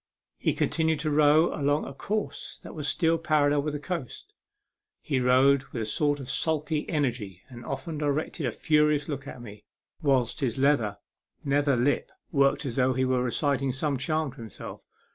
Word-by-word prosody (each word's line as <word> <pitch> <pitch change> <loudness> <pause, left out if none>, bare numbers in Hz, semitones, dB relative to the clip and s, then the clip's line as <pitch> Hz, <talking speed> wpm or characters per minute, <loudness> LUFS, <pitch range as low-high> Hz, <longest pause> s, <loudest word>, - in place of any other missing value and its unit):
He - - +1
continued 160 -1 +1
to 155 -1 -1
row 150 +2 +4
along 145 0 +1
a - - -7
course 210 +9 -4
that - - -9
was 150 -3 -4
still 165 +1 +2
parallel 150 -3 +2
with 150 +1 -3
the - - -3
coast. 155 - -6 0.7
He 140 -4 -1
rowed 130 +2 +4
with 115 -4 -5
a - - -3
sort 145 +6 +1
of 135 - -7
sulky 150 +3 -1
energy, 120 - -2
and 120 -2 -10
often 140 +5 -5
directed 150 0 -1
a - - -1
furious 150 +3 +2
look 140 -3 -5
at 125 -3 -8
me, 105 -2 -11 0.4
whilst 135 -6 +1
his 125 -4 -1
leather 130 -7 +2 0.5
nether 140 0 +2
lip 125 +4 +1 0.2
worked 140 0 +2
as 125 -2 -3
though 130 0 +3
he 130 +1 +1
were 130 -1 +1
reciting 135 +2 0
some 140 +2 -1
charm 155 +2 -1
to 140 - -18
himself. 115 -4 -9
140 Hz, 180 wpm, -27 LUFS, 130-150 Hz, 0.7 s, row